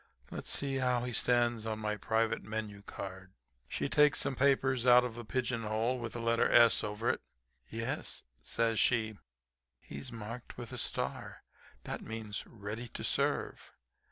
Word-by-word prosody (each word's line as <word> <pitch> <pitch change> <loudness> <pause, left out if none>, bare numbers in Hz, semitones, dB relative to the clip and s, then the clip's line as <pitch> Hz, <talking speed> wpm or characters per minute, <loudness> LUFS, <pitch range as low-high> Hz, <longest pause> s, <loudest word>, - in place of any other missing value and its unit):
Let's - - -6
see 135 -1 0
how 125 -2 +1
he 125 0 -3
stands 120 -2 +2
on 110 -1 -2
my 105 -1 -1
private 110 +2 0
menu 105 -1 -5
card.' 95 -2 -8 0.3
She - - -2
takes 150 0 +5
some 135 - 0
papers 130 -2 +3
out 125 0 +8
of 120 -2 -4
a 120 - -6
pigeon 120 0 -1
hole 110 +4 0
with 120 -1 -5
the 120 - -4
letter 115 0 +2
'S' 115 -1 +7
over 105 +2 -3
it. - - -5 0.5
"'Yes,' 115 +1 -2 0.2
says 115 -2 +1
she, 110 -3 +2 0.6
'he's 70 +2 -7
marked 115 +2 -7
with 120 -2 -6
a - - -3
star; - - -2 0.4
that - - -4
means 110 -2 -5
"ready 110 +2 -6
to - - -7
serve." - - -1
115 Hz, 160 wpm, -33 LUFS, 110-125 Hz, 0.6 s, out